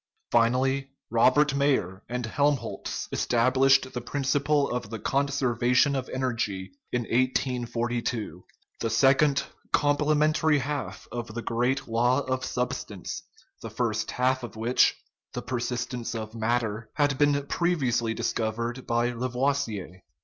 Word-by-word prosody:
Finally, 130 +4 +2 0.2
Robert 130 +5 +4
Mayer 135 -10 +1
and 125 0 -2
Helmholtz 140 +4 -1
established 130 +2 +3
the 125 - -3
principle 140 +3 +1
of 125 -2 -2
energy 125 -4 0 0.2
in 125 - 0
1842 120 - -1 0.4
the 115 - -1
second, 140 +3 +4 0.3
complement 150 +1 +2
ary 155 -2 +5
half 145 +1 -4
of 120 -1 -4
the 120 - -4
great 125 +3 0
law 120 +4 +2
of 130 -1 -2
substance, 125 0 -3 0.4
the - - -6
first - - -1
half 130 +1 +1
of 120 -2 -8
which 115 +3 +3 0.4
(the - - -3
persistence 125 -1 -3
of 110 -1 -5
matter) 115 -1 -1
had 145 -2 +1
been 145 -1 +3
previous 145 -7 +1
ly 115 -1 -1
discovered 115 +2 -2
by 120 +1 +1
Lavoisier. 125 -6 -2
125 Hz, 115 wpm, -27 LUFS, 115-140 Hz, 0.4 s, ary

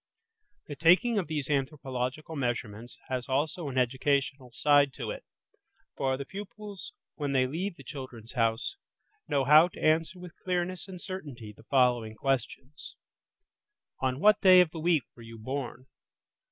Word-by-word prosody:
The 145 - -7
taking 185 - +4
of 185 - -3
these 150 -3 -3
anthropological 135 +1 -2
measurements 120 -3 -3
has 130 -1 -3
also 150 +4 -1
an 130 - -5
educational 130 +1 0
side 145 +2 +4
to - - -5
it, - - -7 0.7
for 130 -1 0
the 140 - -5
pupils, 200 +2 -8 0.2
when 145 -2 -2
they 130 -1 +3
leave 170 +8 -3
the 135 - -13
"Children's 130 -5 -9
House", 115 - 0 0.5
know 140 -1 +1
how 155 +4 +8
to 180 - -13
answer 160 +3 +2
with 180 -2 -10
clearness 180 0 -2
and 185 -2 -9
certainty 145 - -7
the 110 - -18
following 120 -5 +2
questions:– 135 +3 -3 1.0
On 130 0 -1
what 210 +5 +5
day 185 -1 +8
of 180 -3 +4
the 165 - -7
week 160 -3 +2
were 120 - -14
you 115 0 -10
born? 130 +2 -5
140 Hz, 155 wpm, -29 LUFS, 125-165 Hz, 1.0 s, how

